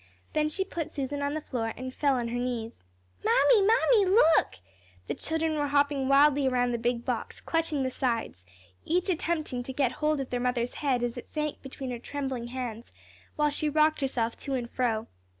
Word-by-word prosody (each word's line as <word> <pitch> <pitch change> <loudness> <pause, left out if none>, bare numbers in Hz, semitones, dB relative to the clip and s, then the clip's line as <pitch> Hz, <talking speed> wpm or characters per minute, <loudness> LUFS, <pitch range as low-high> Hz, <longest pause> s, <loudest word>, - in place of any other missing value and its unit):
Then 305 0 +2
she 385 +5 -1
put 340 -5 -4
Susan 285 0 -3
on 285 +1 -1
the 310 - -2
floor, 225 -6 -3
and 255 0 -6
fell 280 -1 +2
on 240 -2 -2
her 240 +1 -2
knees. 240 - -4 0.4
"Mammy, 345 - +5
Mammy, 445 +1 +4
look!" 330 - +4 0.5
the - - -2
children 320 0 -1
were 290 - +1
hopping 285 -1 +2
wildly 280 0 +5
around 245 -1 +1
the 235 - -1
big 235 0 -1
box, - - -3
clutching 325 -4 0
the 260 - -1
sides, 230 - -2 0.4
each 360 +3 0
attempting 315 -7 -1
to 245 - -4
get 260 -2 +1
hold 305 +1 0
of 270 - -5
their 245 - 0
mother's 245 -1 -1
head 260 -4 0
as 240 0 -2
it 245 - -8
sank 300 -1 -3
between 270 -1 -6
her 240 - -4
trembling 265 -2 -4
hands, 240 -2 -6 0.4
while 300 -1 +2
she 300 +1 0
rocked 310 +1 +3
herself 235 -4 -1
to 275 - -3
and 240 -2 -4
fro. 225 -3 0
270 Hz, 195 wpm, -28 LUFS, 245-305 Hz, 0.5 s, Mammy